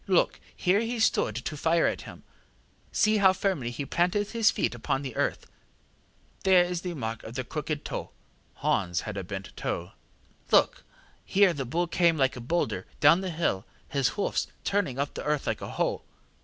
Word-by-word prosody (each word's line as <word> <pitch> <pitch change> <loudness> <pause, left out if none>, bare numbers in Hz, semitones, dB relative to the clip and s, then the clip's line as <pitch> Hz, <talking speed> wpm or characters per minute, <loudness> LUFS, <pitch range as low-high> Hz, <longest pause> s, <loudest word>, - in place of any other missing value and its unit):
Look, 185 -3 +2 0.2
here 185 +3 +2
he 230 +2 -2
stood 110 - +2
to 125 +5 -4
fire 165 +3 +2
at - - 0
him; - - -12 0.7
see 215 0 +3
how 190 -2 +6
firmly 185 - -1
he 140 +4 -4
planted 180 +7 +1
his 230 -2 +4
feet - - 0
upon 120 +3 -2
the 130 -4 -6
earth; - - -1 1.0
there 185 -2 +6
is 175 -1 -3
the 180 -2 -4
mark 115 -5 -4
of 115 - -9
his 130 -1 -3
crooked 150 -1 -3
toe - - -4 0.5
(Hans 85 -1 0
had 110 - -6
one 95 -3 -5
bent 95 -1 -6
toe). 90 +3 -3 0.6
Look! - - +4 0.4
here 195 -2 +4
the 140 -3 -3
bull 170 +8 0
came 170 -1 +2
like 135 -2 +2
a 125 - -7
boulder 170 +9 -1
down 165 +4 +6
the 190 - -3
hill, 160 - 0 0.3
his 140 -2 +2
hoofs 205 - 0 0.2
turning 200 -11 0
up 140 +1 -2
the - - -5
earth 150 -1 0
like - - -2
a - - -5
hoe. - - -1
160 Hz, 185 wpm, -28 LUFS, 125-185 Hz, 1.0 s, how